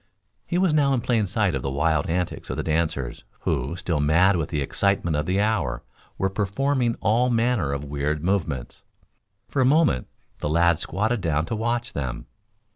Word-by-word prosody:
He 175 - 0
was 180 -3 +3
now 140 -3 +3
in 120 - -1
plain 115 -4 +1
sight 100 -1 +1
of 65 - -2
the 70 - -2
wild 75 +2 +1
antics 90 +1 -2
of - - -3
the - - -1
dancers, 80 -5 -1 0.2
who, 65 +7 -1
still 85 -4 -2
mad 85 +7 +4
with 80 -4 -1
the 75 - -1
excitement 85 +3 +1
of 75 +1 -1
the 95 +2 +1
hour, 95 - 0 0.3
were 95 - +1
performing 115 +6 0
all 120 +3 +3
manner 115 - +1
of 70 0 -3
weird 75 +1 -2
movements. 80 -9 -2 0.7
For 135 - 0
a - - +5
moment, 140 - +3 0.3
the 75 - -2
lad 85 +1 +3
squatted 105 +7 -1
down 80 -2 0
to 115 - -3
watch 120 +2 -1
them. 65 -4 -4
90 Hz, 185 wpm, -24 LUFS, 75-115 Hz, 0.7 s, a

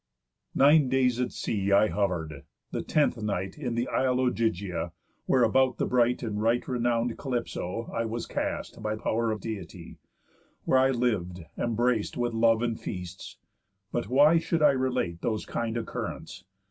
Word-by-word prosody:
Nine 145 0 +5
days 125 -2 +2
at 125 - -1
sea 100 -2 -2
I 100 +2 +5
hover'd; 85 -8 -2 0.3
the - - -2
tenth 145 -6 +1
night 95 -3 -2
In 125 -5 -3
th' 120 +1 0
isle 130 -1 +1
Ogygia, 100 -9 -1 0.3
where, 130 -2 +4
about 130 +2 +3
the - - 0
bright 125 0 +2
And 105 -2 -2
right 115 +2 +1
renown'd 120 -2 0
Calypso, 115 -5 -3
I 115 - -1
was 115 +1 -3
cast - - -4
By 105 0 -1
pow'r 115 +1 -1
of 110 -2 -2
Deity; 95 -6 -7 0.7
where 130 - +4
I 130 +1 +4
lived 100 -9 -1
embrac'd 120 -1 0
With 120 -1 -1
love 115 0 +3
and 115 -2 -1
feasts. 90 -1 -7 0.5
But 120 - -2
why 150 +6 +6
should 165 -1 0
I 150 - +7
relate 130 -10 -1
Those 110 -2 -2
kind 115 0 -3
occurrents? 115 - -6
115 Hz, 160 wpm, -28 LUFS, 105-125 Hz, 0.7 s, I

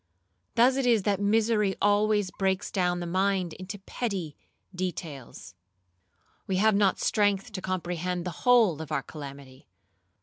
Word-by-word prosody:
Thus 255 +3 +4
it 265 -2 +1
is 230 -5 +3
that 200 -1 +1
misery 210 -1 +2
always 205 -1 +2
breaks 190 0 -1
down 180 -2 0
the - - -3
mind 185 -1 0
into 185 +3 -7
petty 195 -6 -4 0.4
details. 160 - -6 0.9
We 190 - -1
have 215 +3 +4
not 200 -1 +2
strength 205 +1 +1
to 190 -3 -5
comprehend 180 -1 -3
the 175 -3 -6
whole 220 -11 +5
of 160 -1 -8
our 140 -3 -1
calamity. 140 -3 -10
190 Hz, 140 wpm, -27 LUFS, 175-210 Hz, 0.9 s, whole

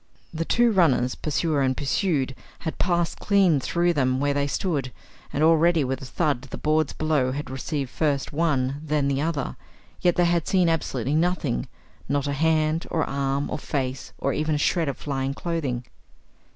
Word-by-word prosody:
The 165 +1 -2
two 240 +4 +3
runners, 140 - +3
pursuer 155 -1 0
and 130 -1 +1
pursued, 140 -2 0 0.3
had 160 - -4
passed 175 -2 0
clean 195 -7 +3
through 175 +6 +1
them 130 -3 +1
where 145 0 +1
they 140 0 0
stood, 140 -5 -1 0.4
and 145 - 0
already 165 0 +4
with 130 0 -2
a - - -7
thud 145 -1 0
the 140 -2 -8
boards 155 -1 +1
below 150 -5 0
had 145 -1 -5
received 135 0 -3
first 145 -3 -1
one, 140 -3 0
then 150 -2 0
the 140 0 0
other. 155 -4 -2 0.4
Yet 175 -1 +3
they 175 - +3
had 170 -1 +1
seen 185 -3 +3
absolutely 140 -5 -1
nothing 160 - 0 0.4
not 140 0 +1
a 140 - -1
hand, 155 +2 +1
or 160 - 0
arm, 140 0 -1
or - - -2
face, 130 -2 -3
or 140 - -1
even 155 0 0
a - - +1
shred 160 +1 +1
of 135 - -4
flying 135 -1 -2
clothing. 140 -9 -2
150 Hz, 180 wpm, -25 LUFS, 135-165 Hz, 0.4 s, already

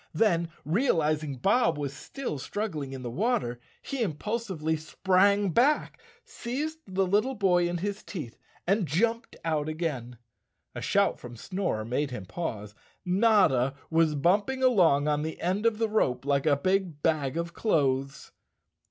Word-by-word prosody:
Then, 170 -7 +2 0.2
realizing 155 - +1
Bob 195 - +2
was 140 -2 -3
still 155 - -6
struggling 155 -4 -4
in 130 -1 -7
the 120 - -4
water, 125 - 0 0.2
he 275 -3 -4
impulsively 190 -3 -2
sprang 190 +5 +2
back, 285 - +2 0.2
seized 300 +7 -4
the 190 0 0
lit¬ 200 +3 +4
tle 265 +3 -4
boy 180 -4 +2
in 175 - -2
his 200 +3 -3
teeth 150 - -7 0.3
and 195 0 +1
jumped 230 - 0
out 155 -2 0
again. 140 -7 -4 0.6
A - - -6
shout - - +2
from 120 -1 -9
Snorer 180 - -3
made 135 +5 -1
him 105 -7 -6
pause. 105 - -5 0.3
Notta 180 - +3 0.2
was 160 -2 +3
bumping 205 - +1
along 170 - +4
on 150 0 +1
the 160 +1 -4
end 190 +6 +1
of 225 -2 +1
the 225 0 +1
rope 135 - 0
like 140 +1 +1
a 145 -2 +4
big 185 -1 -1
bag 155 -2 +1
of 170 0 -3
clothes. 135 -8 0
170 Hz, 150 wpm, -28 LUFS, 145-205 Hz, 0.6 s, lit¬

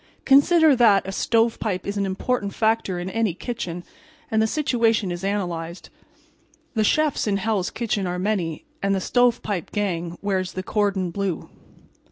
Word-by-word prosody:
Consider 300 +2 +6
that 210 -5 +4
a - - -3
stovepipe 225 -2 0
is 200 - -3
an 200 -1 0
important 200 +2 -2
factor 220 -4 +1
in 175 +1 -4
any 215 -2 0
kitchen 180 -7 -5 0.5
and 220 0 +3
the 220 - +3
situation 230 - +1
is 175 +1 -5
analyzed. 175 -4 -3 0.8
The 220 -3 +1
chefs 300 +2 +1
in 200 -1 +1
"Hell's 200 -2 -1
Kitchen" 210 -5 -2
are 180 0 -2
many, 180 -5 -2 0.2
and 195 0 +1
the - - 0
"Stovepipe" 230 -5 +1
gang, 175 -4 -2
wears 190 -2 -1
the 185 - -4
cordon 195 -4 0
blue. 195 -2 -3
200 Hz, 155 wpm, -23 LUFS, 185-225 Hz, 0.8 s, Consider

